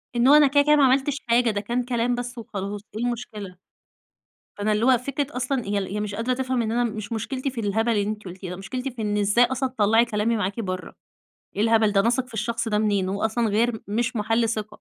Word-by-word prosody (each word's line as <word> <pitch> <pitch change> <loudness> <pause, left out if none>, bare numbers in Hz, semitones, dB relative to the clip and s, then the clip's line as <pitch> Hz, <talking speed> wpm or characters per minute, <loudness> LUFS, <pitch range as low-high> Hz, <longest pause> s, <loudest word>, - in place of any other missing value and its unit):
إنه 265 +5 +6
أنا 295 - +6
كده 285 +1 +4
كده 300 +1 +5
ما 290 - +4
عملتش 270 +2 +3
حاجة، 235 0 +4
ده 205 - -2
كان 240 +3 -1
كلام 245 0 0
بس 245 0 -5
وخلاص 205 -2 -5
إيه 235 +2 -2
المشكلة؟ 215 -6 -5 1.0
فأنا 210 +1 0
اللي 215 +3 +1
هو 260 -1 +5
فكرة 275 +3 -3
أصلًا 255 0 -1
هي 200 -2 -1
هي - - -1
مش 205 -1 -3
قادرة 235 +4 0
تفهم 255 -1 -1
إن 220 -1 -2
أنا 240 +1 +1
مش 215 -2 -4
مُشكلتي 255 +5 -3
في 250 -3 -6
الهبل 220 +3 0
اللي 205 -3 +1
أنتِ 210 0 -4
قُلتيه 185 0 -8
ده، 180 - -5
مُشكلتي 250 +8 -5
في 235 -2 -7
إن 210 -1 -1
إزاي 205 +4 +4
أصلًا 260 +1 -2
تطلَّعي 225 -1 +3
كلامي 220 +1 0
معاكِ 200 +3 -2
برَّا؟ 185 -3 -4 0.6
إيه 205 - +1
الهبل 225 -2 +3
ده، 195 - +4
أنا 225 - +2
أثق 255 +1 0
في 230 - -14
الشخص 230 +1 -2
ده 210 - +1
منين 205 -3 +1
هو 200 +3 -2
أصلًا 220 +1 +1
غير 220 +2 +1
مش 235 +4 -1
مَحَلّ 225 +2 +1
ثقة. 215 -2 -2
225 Hz, 235 wpm, -24 LUFS, 210-245 Hz, 1.0 s, إنه